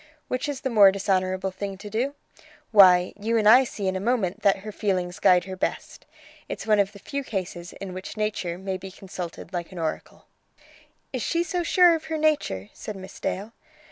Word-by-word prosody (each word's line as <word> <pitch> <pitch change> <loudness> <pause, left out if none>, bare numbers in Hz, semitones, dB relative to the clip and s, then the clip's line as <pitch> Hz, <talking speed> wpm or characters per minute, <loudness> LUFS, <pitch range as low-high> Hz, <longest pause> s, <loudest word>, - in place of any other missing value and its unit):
Which 255 +3 -2
is 275 -2 -4
the 265 - -2
more 205 -4 +7
dishonourable 190 -1 0
thing 195 +1 -5
to 200 +2 -10
do? 245 +7 -2 0.6
Why, 185 -4 +7
you 225 +3 0
and 215 -2 +2
I 245 +5 +8
see 205 -5 -4
in 190 - 0
a - - -1
moment 210 -2 0
that 200 -1 +4
her 215 - -5
feelings 185 -3 -2
guide 180 -3 +5
her 190 +1 -7
best. 185 - -4 0.4
It's - - -5
one 215 -1 +3
of 200 0 +1
the - - -11
few 280 +7 -5
cases 180 -6 -5
in 190 -2 -7
which 185 +4 -8
nature 205 -5 -2
may 190 0 -4
be 190 +1 -9
consulted 185 -2 -8
like 175 0 -4
an 185 - -10
oracle." 160 -2 -5 0.9
"Is 255 - -2
she 335 +9 0
so 350 +1 -2
sure 350 0 +5
of 320 -1 -3
her 320 - -3
nature?" 295 - 0
said 215 - -7
Miss 190 0 -10
Dale. 205 +4 -3
200 Hz, 205 wpm, -25 LUFS, 185-230 Hz, 0.9 s, I